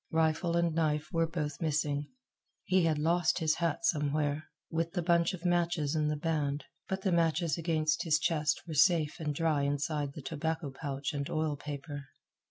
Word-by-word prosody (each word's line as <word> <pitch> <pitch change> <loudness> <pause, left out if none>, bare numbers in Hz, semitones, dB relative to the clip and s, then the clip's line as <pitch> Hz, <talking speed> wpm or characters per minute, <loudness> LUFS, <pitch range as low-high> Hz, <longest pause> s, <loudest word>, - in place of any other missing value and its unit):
Rifle 160 +1 +1
and 170 -1 +2
knife 155 -2 0
were 165 -1 +2
both 155 -2 -4
missing. 150 -2 0 0.6
He 185 -2 +3
had 160 -2 +2
lost 170 +4 +2
his 160 -3 +2
hat 170 +4 0
somewhere, 150 -4 +1 0.3
with 165 0 -1
the 175 - -1
bunch 170 +1 +3
of 180 0 -12
matches 170 -4 +1
in 155 -1 +1
the 150 - 0
band, 150 -2 -1 0.2
but 190 0 -3
the 190 - +2
matches 165 -2 +2
against 155 -2 +1
his 155 -2 +3
chest 150 -1 0
were 160 - -5
safe 160 0 +3
and 150 -3 -2
dry 160 -2 +1
inside 145 0 -1
the 150 - -8
tobacco 160 0 -2
pouch 140 0 -4
and 140 -1 -3
oil 155 -1 0
paper. 145 -1 -7
155 Hz, 180 wpm, -31 LUFS, 150-165 Hz, 0.6 s, He